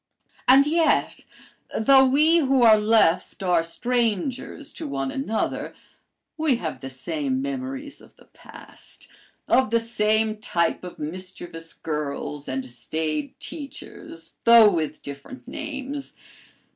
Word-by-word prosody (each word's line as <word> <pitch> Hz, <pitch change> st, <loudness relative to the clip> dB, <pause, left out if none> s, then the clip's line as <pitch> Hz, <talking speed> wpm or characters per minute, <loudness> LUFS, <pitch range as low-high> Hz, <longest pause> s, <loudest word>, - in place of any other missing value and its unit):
"And 270 Hz, +2 st, +7 dB
yet, 320 Hz, +1 st, +1 dB, 0.5 s
though 265 Hz, +4 st, +6 dB
we 305 Hz, +6 st, +5 dB
who 270 Hz, -4 st, +3 dB
are 220 Hz, -2 st, +7 dB
left 210 Hz, -4 st, +2 dB
are 175 Hz, -3 st, +3 dB
strangers 240 Hz, -, -2 dB
to -, -, -7 dB
one 135 Hz, -1 st, -3 dB
another, 225 Hz, -5 st, -3 dB, 0.6 s
we 310 Hz, -5 st, +2 dB
have 165 Hz, -9 st, -5 dB
the 135 Hz, -, -6 dB
same 260 Hz, -, -2 dB
memories 275 Hz, +1 st, -5 dB
of -, -, -18 dB
the -, -, -21 dB
past, -, -, -15 dB, 0.4 s
of 260 Hz, -4 st, +3 dB
the 230 Hz, +1 st, +3 dB
same 220 Hz, -1 st, +1 dB
type 175 Hz, -7 st, -1 dB
of 180 Hz, -, -9 dB
mischievous 165 Hz, 0 st, -6 dB
girls 150 Hz, -1 st, -4 dB
and 130 Hz, 0 st, -3 dB
staid 150 Hz, +4 st, -4 dB
teachers, 275 Hz, -, -8 dB
though 230 Hz, -2 st, +8 dB
with 155 Hz, -3 st, -3 dB
different 140 Hz, -, -9 dB
names. 285 Hz, -2 st, -6 dB
220 Hz, 120 wpm, -24 LUFS, 165-270 Hz, 0.6 s, though